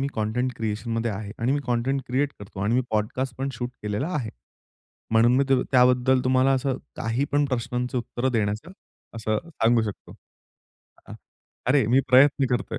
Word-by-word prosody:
मी 135 Hz, -, 0 dB
content 120 Hz, +4 st, -1 dB
क्रिएशनमध्ये 115 Hz, +1 st, -2 dB
आहे 105 Hz, +1 st, -6 dB
आणि 125 Hz, +4 st, +1 dB
मी 145 Hz, -, 0 dB
content 125 Hz, +3 st, 0 dB
create 135 Hz, +3 st, 0 dB
करतो 95 Hz, -1 st, -9 dB
आणि 115 Hz, +3 st, +1 dB
मी 125 Hz, -, +4 dB
पॉडकास्ट 115 Hz, +4 st, -1 dB
पण 135 Hz, -, -1 dB
शूट 125 Hz, -1 st, -4 dB
केलेला 105 Hz, +8 st, -2 dB
आहे. 115 Hz, -6 st, -3 dB, 0.8 s
म्हणून 115 Hz, +2 st, +5 dB
मी 140 Hz, -, +3 dB
तू 135 Hz, -1 st, +3 dB
त्याबद्दल 125 Hz, 0 st, +4 dB
तुम्हाला 130 Hz, +1 st, +3 dB
असं 130 Hz, 0 st, -1 dB, 0.2 s
काही 115 Hz, +5 st, -1 dB
पण 145 Hz, 0 st, +3 dB
प्रश्नांची 125 Hz, 0 st, -2 dB
उत्तर 120 Hz, +2 st, -2 dB
देण्याचं 110 Hz, -, -2 dB, 0.4 s
असं 110 Hz, -1 st, -1 dB
सांगू 120 Hz, -7 st, +2 dB
शकतो. 105 Hz, -3 st, -7 dB, 0.9 s
अ, -, -, -10 dB, 0.5 s
अरे 130 Hz, -3 st, +3 dB
मी 125 Hz, +4 st, +4 dB
प्रयत्न 135 Hz, +1 st, +5 dB
करतोय, 125 Hz, -, -1 dB
125 Hz, 165 wpm, -25 LUFS, 115-130 Hz, 0.9 s, म्हणून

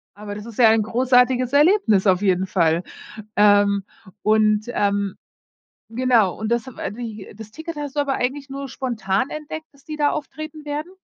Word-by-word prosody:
Aber 205 Hz, 0 st, -7 dB
das 210 Hz, +1 st, -8 dB
ist 235 Hz, 0 st, -10 dB
ja 225 Hz, -2 st, +7 dB
ein 220 Hz, 0 st, +4 dB
großartiges 250 Hz, +2 st, +2 dB
Erlebnis 290 Hz, -, +4 dB
auf 185 Hz, +1 st, +3 dB
jeden 190 Hz, -1 st, +1 dB
Fall. 170 Hz, -2 st, +1 dB, 0.5 s
Ähm, 205 Hz, -1 st, +4 dB, 0.4 s
und, 215 Hz, 0 st, +3 dB
ähm, 200 Hz, -4 st, -1 dB, 0.7 s
genau, 230 Hz, -5 st, +2 dB
und 215 Hz, 0 st, -3 dB
das 235 Hz, +2 st, 0 dB
hab 260 Hz, -, -11 dB
ah -, -, -3 dB
wie, 220 Hz, -4 st, -8 dB
das 220 Hz, -1 st, -10 dB
Ticket 320 Hz, +5 st, -8 dB
hast 290 Hz, -1 st, -6 dB
du -, -, +3 dB
aber 280 Hz, -1 st, 0 dB
eigentlich 275 Hz, +3 st, -2 dB
nur 275 Hz, 0 st, -6 dB
spontan 235 Hz, -2 st, -2 dB
entdeckt, 310 Hz, +1 st, -7 dB
dass 280 Hz, -1 st, -24 dB
die 305 Hz, -1 st, -6 dB
da 290 Hz, -1 st, +2 dB
auftreten 310 Hz, +1 st, -6 dB
werden? 300 Hz, +4 st, -4 dB
235 Hz, 180 wpm, -22 LUFS, 205-285 Hz, 0.7 s, ja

